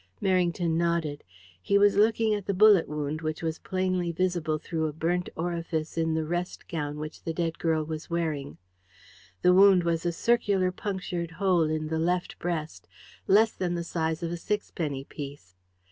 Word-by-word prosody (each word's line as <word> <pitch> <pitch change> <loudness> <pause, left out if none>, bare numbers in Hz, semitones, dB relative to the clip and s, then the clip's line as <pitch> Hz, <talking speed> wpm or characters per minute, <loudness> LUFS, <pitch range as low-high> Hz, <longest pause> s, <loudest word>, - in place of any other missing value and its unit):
Merrington 175 -3 +1
nodded. 170 -4 0 0.4
He 200 - +2
was 205 0 +5
looking 220 +1 +3
at 205 -2 -3
the 200 - 0
bullet 205 -3 +6
wound, 150 +1 -3
which 155 +1 -3
was 160 0 -2
plainly 185 -2 -1
visible 170 -3 0
through 160 0 -2
a - - -3
burnt 175 +3 -1
orifice 165 -2 -3
in 160 -1 0
the 160 -1 -1
rest 175 +2 -4
gown 150 -3 -3
which 155 +1 -7
the 165 - -4
dead 165 -1 -2
girl 160 -2 +1
was 155 0 -6
wearing. 155 -5 -2 0.9
The 180 - +6
wound 190 -1 +6
was 165 -1 0
a 175 - +1
circular 195 -2 +2
punctured 185 -3 -4
hole 175 -2 +2
in 155 0 -2
the 160 0 -1
left 175 +2 -1
breast, 165 -3 -4 0.4
less 220 +3 +5
than 175 -2 -2
the 170 - -2
size 160 -1 -2
of 170 - -2
a 175 - -3
sixpenny 165 -8 -3
piece. 140 - -9
170 Hz, 175 wpm, -27 LUFS, 160-185 Hz, 0.9 s, bullet